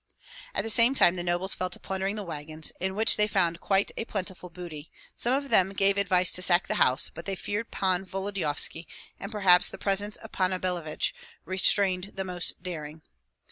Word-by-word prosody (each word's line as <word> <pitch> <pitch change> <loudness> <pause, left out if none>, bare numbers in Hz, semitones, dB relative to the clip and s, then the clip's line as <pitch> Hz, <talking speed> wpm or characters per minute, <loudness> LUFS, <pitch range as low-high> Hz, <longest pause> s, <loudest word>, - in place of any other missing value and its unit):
At - - 0
the 225 - +3
same 235 +4 +6
time 175 - +5
the 180 - -3
nobles 175 +2 0
fell 185 - -2
to 175 - -5
plundering 195 +1 -3
the 210 - -3
wagons, 155 -2 -4
in 190 +1 -3
which 220 +2 +5
they 210 0 +2
found 170 -4 0
quite 195 0 +1
a 225 - -4
plentiful 190 -4 -5
booty; 170 -3 -10 0.3
some 245 +2 0
of 280 0 -4
them 190 +1 +4
gave 195 0 +3
advice 185 -2 +2
to 180 - 0
sack 180 0 +3
the - - -1
house, 130 +1 +2
but 170 - -10
they 195 - -3
feared 205 +4 -4
Pan 185 -1 -1
Volodyovski, 185 -4 -1 0.3
and 200 - -7
perhaps 190 -4 +4
the - - -9
presence 200 +1 -1
of 220 - -10
Panna 185 0 -1
Billevich 175 -4 -2 0.3
restrained 185 0 +2
the 195 - -3
most 180 -1 -4
daring. 155 -3 -7
185 Hz, 195 wpm, -27 LUFS, 175-200 Hz, 0.3 s, same